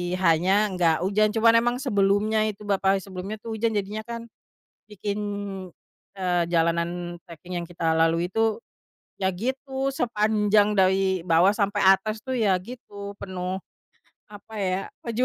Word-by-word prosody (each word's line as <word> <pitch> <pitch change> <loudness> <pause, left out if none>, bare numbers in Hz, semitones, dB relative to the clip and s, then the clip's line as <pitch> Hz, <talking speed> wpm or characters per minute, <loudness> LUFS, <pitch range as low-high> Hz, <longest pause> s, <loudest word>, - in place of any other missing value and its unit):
H-nya 190 +4 +3
gak 165 -2 +4
hujan 210 +3 +2
cuman 230 +1 +5
emang 240 +1 0
sebelumnya 215 -1 +2
itu 210 -1 -6
bapa 195 -1 +2
sebelumnya 195 +2 -6
tuh 230 - -6
hujan 225 -1 +1
jadinya 210 +2 -3
kan, 235 0 -5 0.7
bikin, 205 0 -4 1.0
eee, 180 -2 +1
jalanan 170 +1 0
treking 175 +2 -9
yang - - -7
kita 165 -2 0
lalui 165 +1 +2
itu, 225 +1 +1 0.6
ya 190 -1 0
gitu 265 +6 -3
sepanjang 210 -3 +2
dari 190 -1 +2
bawah 175 +3 +4
sampai 205 -1 0
atas 215 +3 -1
tuh 260 +3 -3
ya 210 -5 +3
gitu 200 -2 -9
penuh, 185 -1 -4 0.7
apa 210 +1 -13
ya, 185 -1 0 0.2
perjuangan 235 +2 -1
200 Hz, 140 wpm, -25 LUFS, 185-215 Hz, 1.0 s, cuman